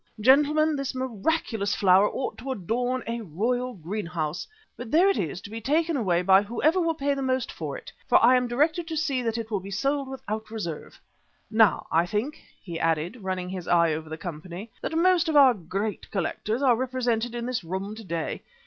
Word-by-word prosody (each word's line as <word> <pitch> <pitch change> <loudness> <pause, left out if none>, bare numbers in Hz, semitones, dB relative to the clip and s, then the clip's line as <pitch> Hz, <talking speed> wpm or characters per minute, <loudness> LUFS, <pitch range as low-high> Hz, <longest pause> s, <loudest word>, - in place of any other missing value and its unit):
Gentlemen, 295 +6 +4
this 275 -1 -3
miraculous 235 -3 -1
flower 195 +1 +5
ought 265 - -4
to 265 +4 -5
adorn 245 +4 -1
a 235 +1 -3
royal 240 +7 -2
greenhouse. 170 -3 -4 0.3
But 245 -2 -8
there 340 +8 +5
it - - -2
is, 170 +1 -3
to 205 - -10
be 225 +1 -6
taken 320 +6 +1
away 180 -8 +1
by 190 +1 +6
whoever 295 - +1
will 330 -1 +1
pay 285 -1 0
the 275 - -3
most 260 -2 -1
for 150 -4 -5
it, - - -11 0.2
for 245 - +7
I 250 +2 +6
am 250 -1 +2
directed 310 +7 +1
to 320 -1 -3
see 280 -5 0
that 230 -1 -1
it 225 -1 -5
will 205 - 0
be 190 +1 -9
sold 275 +8 -1
without 220 -5 -5
reserve. 175 -9 -6 0.5
Now, 220 -2 +4
I 165 +2 +3
think," 220 - -3 0.2
he 170 -3 -5
added, 165 +6 0
running 185 -1 -3
his 185 -2 -6
eye 170 -2 +4
over 155 0 -5
the 160 - -5
company, 175 +5 -7
"that 320 - -2
most 355 -1 +3
of 315 - 0
our 275 -3 +8
great 200 +2 -4
collectors 215 +5 -2
are 250 -3 +5
represented 245 -2 -1
in 235 0 -3
this 250 -4 -2
room 190 +4 -4
to 220 +1 -9
day. 170 -4 -3
225 Hz, 205 wpm, -26 LUFS, 185-265 Hz, 0.5 s, our